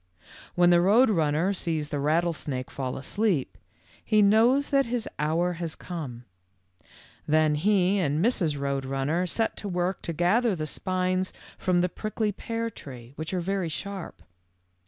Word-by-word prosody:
K - - -31 0.3
When 175 0 +5
the 175 0 +5
Road 220 +7 +5
Runner 165 +1 +1
sees 160 -5 -2
the 145 - -2
rattlesnake 150 -3 -1
fall 130 -2 -4
asleep, 185 - -1 0.5
he 215 -1 +3
knows 235 +7 +4
that 275 -2 +3
his 235 -1 -2
hour 165 +4 +1
has 165 -2 -3
come. 135 -9 -7 1.0
Then 155 0 +3
he 190 +4 +2
and 150 -5 0
Mrs. 170 - +1
Road 140 -1 -1
Runner 135 +7 -1
set 225 +5 0
to 205 - -6
work 180 +1 -1
to - - -4
gather 195 +7 +2
the 155 -2 -3
spines 185 +2 -1 0.2
from 180 -2 +1
the 180 - +2
prickly 215 +3 -2
pear 230 +3 -4
tree, 125 - -11
which 155 +1 -5
are 185 -2 -1
very 190 -1 -1
sharp. 195 +3 -6
175 Hz, 155 wpm, -27 LUFS, 150-200 Hz, 1.0 s, When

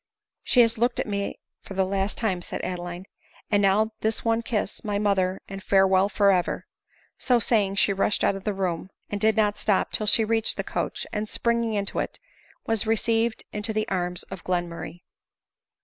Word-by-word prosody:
" - - -67
She 250 - +5
has 230 -1 +2
looked 240 +1 +1
at - - 0
me 200 -1 -3 0.2
for 195 - -10
the 190 0 +2
last 195 +1 -1
time," 190 -6 0
said - - -5
Adeline; 175 0 -5 0.2
" - - -29
and 205 -1 +4
now 205 +3 +3
this 220 +1 -1
one 225 0 +2
kiss, 220 -3 -2
my 205 -1 -1
mother, 195 -2 +1
and 195 0 -7
farewell 190 0 +4
for 200 -1 +4
ever 180 -2 0 0.3
!" - - -33
So 250 - +3
saying 205 -4 +2
she 200 0 +3
rushed 195 +2 +1
out 200 - +3
of 195 - -7
the 210 -1 -2
room, 185 -2 -2 0.2
and 205 -1 -3
did 220 0 +3
not 210 -1 +2
stop 205 -3 +1
till 215 - 0
she 220 +1 +5
reached 225 0 +1
the - - -1
coach, - - -3
and, 210 0 -2
springing 235 -1 0
into 200 -1 -2
it, - - -3 0.5
was 225 -1 0
received 225 +1 +1
into 210 +1 -2
the 215 0 -1
arms 180 -1 -2
of 195 -1 -9
Glenmurray. 175 0 -3
205 Hz, 200 wpm, -25 LUFS, 190-220 Hz, 0.5 s, She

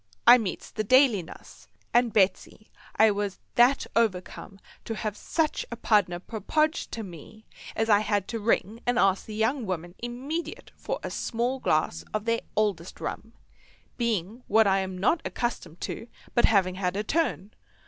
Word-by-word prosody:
—I 250 - +9
meets 200 -6 -5
the 215 - -2
daily 255 -2 +5
nuss; 165 - -14 0.3
and, 240 -1 +4
Betsy, 200 +1 0 0.2
I 220 0 +5
was 205 -1 -2 0.2
that 245 +3 +4
overcome 195 -2 -1 0.3
to 225 - -3
have 215 -1 -3
such 315 +5 -1
a 235 - -5
pardner 205 -6 +2
propoged 305 - -1
to 225 - -4
me 195 +4 -12 0.3
as 225 - 0
I 205 -2 +5
had 205 -2 0
to 230 - -3
ring 220 +1 0
and 245 0 +2
ask 195 -3 +2
the 215 - -6
young 225 +2 0
woman 175 -1 -4
immediate 265 +8 -5
for - - -4
a - - -4
small 245 +3 -2
glass 155 - 0
of 215 0 -2
their 230 0 +1
oldest 195 -5 -1
rum, 225 +1 -6 0.6
being 225 -1 -1
what 220 +1 +5
I 195 -1 +3
am 190 -1 -4
not 255 - +2
accustomed 180 -9 -4
to 230 - -5 0.3
but 240 - +4
having 190 -4 +3
had 180 +1 0
a 210 - -1
turn. 215 - -1
215 Hz, 170 wpm, -27 LUFS, 195-240 Hz, 0.6 s, I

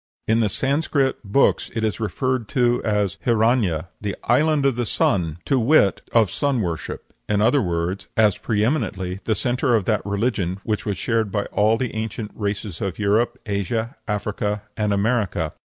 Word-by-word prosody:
In 110 +1 +3
the 110 -2 +2
Sanscrit 135 +2 0
books 105 +7 +2
it 115 - -1
is 105 -5 -1
referred 115 +3 -1
to 120 -1 +3
as 105 -4 0
Hiranya, 110 - +2
the 105 -2 -3
"Island 150 +3 +3
of 135 -3 +3
the 120 -1 -2
Sun," 85 -7 +1
to 135 - +2
wit, 115 -5 +4
of 115 -4 +3
sun 140 -3 0
worship; 85 -4 -5 0.2
in 105 -1 +2
other 120 +6 +4
words, 85 +1 -2
as 105 -3 +4
pre 105 -1 0
eminently 95 -9 -1
the 110 - +1
centre 120 +3 +1
of 105 -4 +1
that 105 -3 +1
religion 100 -3 -1
which 110 -1 -2
was 100 -3 -1
shared 110 -2 0
by 100 0 -1
all 110 +2 +3
the 125 0 -3
ancient 110 0 -4
races 100 -3 -4
of 95 -3 -2
Europe, 110 +4 +1
Asia, 110 +3 -2
Africa, 105 0 -2
and 105 -1 0
America. 100 -6 0
110 Hz, 170 wpm, -22 LUFS, 100-120 Hz, 0.2 s, wit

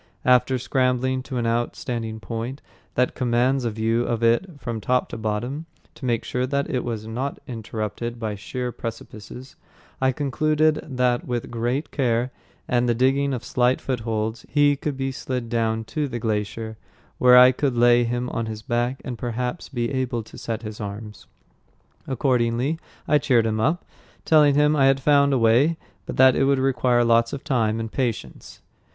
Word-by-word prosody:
After 125 +1 +4
scrambling 130 0 0
to 130 0 -6
an 120 - -1
outstanding 115 -1 -2
point 115 +4 -5 0.3
that 125 0 +2
commands 125 +1 +1
a - - +1
view 115 +2 0
of 115 -1 -2
it 145 +8 +1
from 115 -4 -4
top 125 +3 +1
to - - -6
bottom, 120 +8 -3 0.3
to 155 -3 -9
make 120 -2 0
sure 125 +1 -2
that 140 +1 -1
it 125 - -1
was 115 -3 -4
not 125 +5 -3
interrupted 115 0 -5
by 110 -2 -2
sheer 125 +5 -4
precipices, 115 +2 -8 0.4
I 130 0 +3
concluded 150 +3 +1 0.2
that 125 -1 +1
with 120 -2 -3
great 120 +6 -2
care 125 -2 0 0.4
and 120 0 +1
the 120 - +2
digging 135 +3 +2
of 125 -3 -3
slight 125 +1 +1
footholds 110 -3 -2
he 145 -1 +4
could 140 0 -4
be 135 0 -2
slid 125 -2 -4
down 115 -1 0
to 150 -1 0
the 120 -3 -4
glacier, 110 0 -3 0.4
where 125 0 +7
I 125 +1 +9
could 130 -1 -1
lay 120 0 +5
him 120 +1 -2
on 115 -1 -2
his 110 -1 -6
back 120 +3 -1
and 125 -3 -5
perhaps 125 +5 -3
be 120 -2 -2
able 130 -3 -1
to - - -15
set 115 -1 -4
his 105 -1 -7
arms. 105 +1 -7 0.8
Accordingly, 130 +2 0 0.3
I 150 - +4
cheered 120 -6 +3
him 110 -1 0
up, 155 +10 0 0.4
telling 150 -3 +5
him 150 +1 +4
I 135 -2 +4
had 135 0 +3
found 140 0 +4
a 135 - +3
way, 125 +8 +3 0.3
but - - -5
that 130 -1 +7
it 135 - +2
would 140 0 +3
require 125 -2 +2
lots 115 0 +3
of 140 - -5
time 115 -6 0
and 115 -1 -4
patience. 125 -5 -4
125 Hz, 175 wpm, -23 LUFS, 115-135 Hz, 0.8 s, I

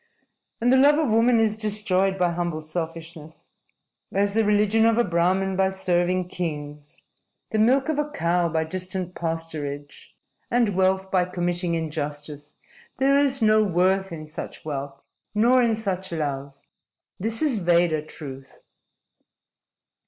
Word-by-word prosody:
And 245 +2 +3
the - - +6
love 290 +3 +5
of 305 -7 +1
woman 230 +1 +4
is 220 -1 +2
destroyed 200 -3 +1
by 180 -2 +2
humble 170 -2 -3
selfishness 160 -1 -7 0.6
as 200 +1 +1
the 225 +1 +3
religion 210 +1 +3
of 230 0 +2
a 240 - +4
Brahmin 185 +1 +1
by 190 0 +2
serving 185 -1 0
kings, 150 -4 -6 0.5
the 220 - 0
milk 260 +6 +3
of 310 -2 0
a 295 0 -1
cow 170 - 0
by 160 0 0
distant 185 +2 -4
pasturage, 155 -4 -5 0.4
and 235 -2 +2
wealth 190 0 +1
by 185 -2 +3
committing 175 -1 -2
injustice. 150 -2 -5 0.4
There 275 +1 +3
is 275 -3 +1
no 215 0 +5
worth 190 0 +1
in 155 -2 -7
such 155 - -8
wealth 140 -2 -5 0.4
nor 245 +4 +4
in 230 -2 +2
such 190 -4 -3
love. 140 -3 -3 0.6
This 225 +7 -1
is 270 -8 +1
Veda 170 -3 +2
truth." 135 -3 -10
180 Hz, 140 wpm, -24 LUFS, 160-215 Hz, 0.6 s, the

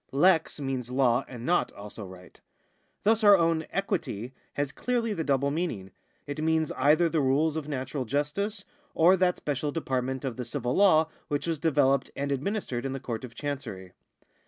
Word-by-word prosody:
Lex 160 +2 +3
means 130 -3 -3
law 125 -1 +2
and 120 -2 -8
not 175 +1 +2
also 105 +1 -9
right. 90 -1 -13 0.6
Thus 220 +1 +3
our 205 -1 +8
own 165 -2 +1
equity 155 - -2 0.2
has 145 -1 -1
clearly 235 +3 -1
the 165 - -2
double 140 -1 +1
meaning; 140 - -3 0.3
it 145 +2 -4
means 160 -1 +1
either 155 +5 +3
the 165 -2 +1
rules 145 +4 +2
of 155 -2 -4
natural 135 -1 -3
justice, 190 - -2 0.3
or 175 +4 +6
that 180 -1 +2
special 145 0 -2
department 130 -3 -2
of 125 -3 -3
the 125 - -3
civil 125 0 -2
law 160 -6 +5 0.2
which 145 -2 -2
was 165 -3 -1
developed 140 -4 +2
and 140 0 -2
administered 140 - -2
in 135 -1 -3
the 135 - -4
Court 115 -2 -5
of 120 -2 -9
Chancery. 120 -11 -5
145 Hz, 175 wpm, -28 LUFS, 130-165 Hz, 0.6 s, our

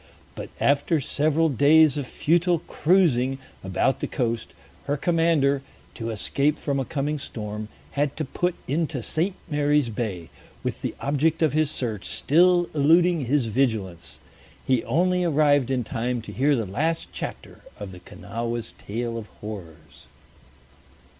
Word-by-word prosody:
But - - -7
after 145 +3 +2
several 155 +4 +1
days 150 +2 +5
of 145 -3 -3
futile 175 +5 +2
cruising 145 -7 +2 0.3
about 95 +8 +1
the - - -2
coast, 115 -3 -2 0.3
her 145 +1 0
commander, 160 -4 +2 0.3
to 115 -1 -5
escape 140 +8 0
from 140 -2 -1
a 135 - -1
coming 150 +2 -2
storm, 105 -4 -6 0.2
had 145 0 -1
to 155 - -2
put 175 +6 -1
into 150 -3 -1
St. 180 - -1
Mary's 145 -4 +2
Bay, 105 -7 -4 0.3
with - - -3
the - - -3
object 150 +4 +1
of 155 - +2
his 155 -1 +2
search 110 -8 -4
still 175 +4 +3
eluding 165 +1 +4
his 135 +1 +2
vigilance. 110 -8 -1 0.5
He 130 -3 +2
only 180 +7 +2
arrived 145 -5 +3
in 130 -2 0
time 120 +1 -2
to - - -8
hear 140 +3 +2
the 115 -4 -1
last 155 - -1
chapter - - -7 0.2
of 100 -2 -6
the 90 - -11
Kanawha's 115 +4 -5
tale 115 +2 -3
of 110 - -9
horrors. 85 -7 -10
140 Hz, 145 wpm, -25 LUFS, 115-155 Hz, 0.5 s, days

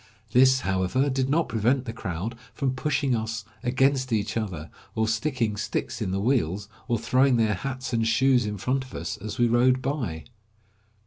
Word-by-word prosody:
This, 130 +2 +5
however, 95 +9 +1
did 130 0 0
not 160 +3 +2
prevent 120 +4 +1
the 115 - -5
crowd 95 +1 -4 0.2
from 135 -1 0
pushing 135 0 0
us 110 -1 -3 0.2
against 130 +1 +1
each 110 -2 0
other, 90 -9 -4 0.2
or 110 0 +1
sticking 115 -1 0
sticks - - -3
in - - -1
the 95 +1 -1
wheels, 105 - 0 0.2
or 120 -2 +1
throwing 125 +3 +3
their 110 -2 +2
hats 130 +5 -4
and 115 -1 +1
shoes 125 0 +3
in 105 0 -3
front 130 +7 0
of 130 - -12
us, 85 - -4
as 105 +4 -6
we 120 -1 +4
rode 125 +2 +4
by. 130 - -3
120 Hz, 180 wpm, -26 LUFS, 110-130 Hz, 0.2 s, This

